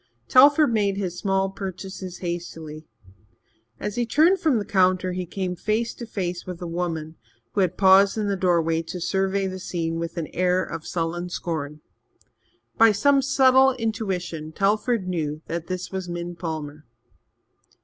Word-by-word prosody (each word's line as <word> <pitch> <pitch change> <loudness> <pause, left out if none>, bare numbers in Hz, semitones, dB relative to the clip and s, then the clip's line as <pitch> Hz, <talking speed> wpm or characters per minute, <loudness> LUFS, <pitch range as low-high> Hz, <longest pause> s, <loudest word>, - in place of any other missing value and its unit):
Telford 285 0 +6
made 200 -3 +1
his 180 -3 -3
small 195 -1 0
purchases 190 -1 -7
hastily. 160 -3 -6 0.9
As 210 - -4
he 240 - +1
turned 330 - +4
from 300 -7 +2
the 205 - -2
counter, 185 -1 +2
he 180 0 -4
came 185 0 -3
face 220 +5 -1
to 235 - -9
face 180 -5 -3
with 180 -2 -7
a 180 - -6
woman 165 -2 -4 0.4
who 200 - +1
had 185 -1 0
paused 195 +2 +6
in 210 -1 -1
the 200 - 0
doorway 170 -3 +1
to 165 +2 -7
survey 195 +2 0
the 185 0 -4
scene 165 -2 -3
with 170 +1 -5
an 165 - -2
air 180 +1 +2
of 160 - -7
sullen 175 +1 -2
scorn. 155 -4 -4 1.0
By 225 -1 +7
some 275 +7 +3
subtle 265 -1 +5
intuition 190 -9 -3
Telford 210 +2 +1
knew 155 -3 -3
that 170 0 -4
this 185 -1 -4
was 190 -2 -4
Min 175 0 -5
Palmer. 155 -3 -6
185 Hz, 160 wpm, -24 LUFS, 170-205 Hz, 1.0 s, By